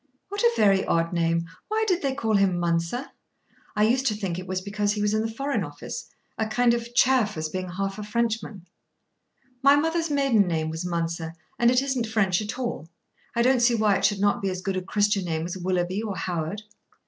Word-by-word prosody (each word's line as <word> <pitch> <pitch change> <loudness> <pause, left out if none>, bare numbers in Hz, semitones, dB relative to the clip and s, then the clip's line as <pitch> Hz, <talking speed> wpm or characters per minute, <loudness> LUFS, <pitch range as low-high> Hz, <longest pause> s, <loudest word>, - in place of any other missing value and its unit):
What 405 +1 -3
a 475 - +6
very 195 -2 +4
odd 165 +1 +1
name. 170 0 +1 0.2
Why 440 +1 0
did 365 -3 +1
they 270 -2 -1
call 225 -5 -1
him 195 -3 +3
Mounser? 170 +9 -1 0.6
I 210 - +3
used 255 +5 +2
to 215 - +1
think 190 -4 -3
it 185 - -8
was 185 +1 -1
because 205 +2 -1
he 210 - -4
was 210 0 +1
in 215 - +2
the 225 0 -2
Foreign 275 +5 -1
Office, - - -7 0.3
a 220 - +1
kind 240 +2 +3
of 235 0 -4
chaff, 245 -7 +3
as 155 0 -2
being 185 +2 -4
half 195 +3 -3
a - - -4
Frenchman." 220 -3 -2 1.0
"My 280 +1 +7
mother's 325 +2 0
maiden 275 -9 +3
name 160 -2 -1
was 160 +2 -4
Mounser, 165 -1 -3 0.2
and 235 - +5
it 250 +2 +3
isn't 260 -4 -1
French 210 -4 +1
at 215 +3 -5
all. 235 -10 -4 0.5
I 235 - +3
don't 255 0 +4
see 240 0 +4
why 215 -3 +3
it - - -2
should 205 -2 +2
not 205 0 +2
be 195 - 0
as 185 0 -4
good 195 -1 -1
a 185 - -1
Christian 205 +1 +1
name 160 -1 -2
as 175 - -4
Willoughby 185 +1 -1
or 210 -3 -4
Howard." 175 +4 -3
205 Hz, 220 wpm, -25 LUFS, 180-235 Hz, 1.0 s, My